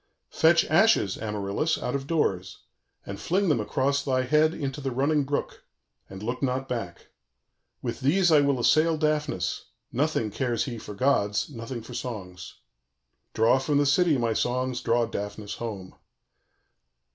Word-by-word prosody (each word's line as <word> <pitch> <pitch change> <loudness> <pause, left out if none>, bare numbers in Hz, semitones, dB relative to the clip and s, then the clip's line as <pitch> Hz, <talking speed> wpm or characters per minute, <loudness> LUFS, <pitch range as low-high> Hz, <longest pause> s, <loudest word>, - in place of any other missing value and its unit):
_ - - -16
"Fetch 165 +1 +5
ashes, 175 - +3
Amaryllis, 105 +8 -2
out 125 - -3
of 140 0 -3
doors, 95 - -1 0.4
and 100 0 -7
fling 190 +2 +1
them 145 - +2
across 140 +6 0
thy 130 -2 +1
head 150 +4 +3
into 140 -1 -4
the 135 - -2
running 140 +3 +1
brook; 145 +1 -3 0.5
and 95 +1 -9
look 120 +3 -3
not 130 0 -1
back. 115 -10 -5 0.7
With - - -3
these 175 +6 +3
I 150 -2 +6
will 140 -2 +1
assail 155 +6 +3
Daphnis: 150 - -1 0.3
nothing 130 -5 0
cares 120 +1 -1
he 120 -5 -5
for 105 - -9
gods, 105 -1 +1
nothing 115 -1 -6
for - - -10
songs. 90 -7 -7 0.8
"_Draw 115 +4 +4
from 145 +1 +1
the 145 - +3
city, 150 +2 +3
my 115 -2 0
songs, 125 +2 -1
draw 120 0 +2
Daphnis 105 -1 -6
home. 100 -6 -6
130 Hz, 155 wpm, -26 LUFS, 110-150 Hz, 0.8 s, I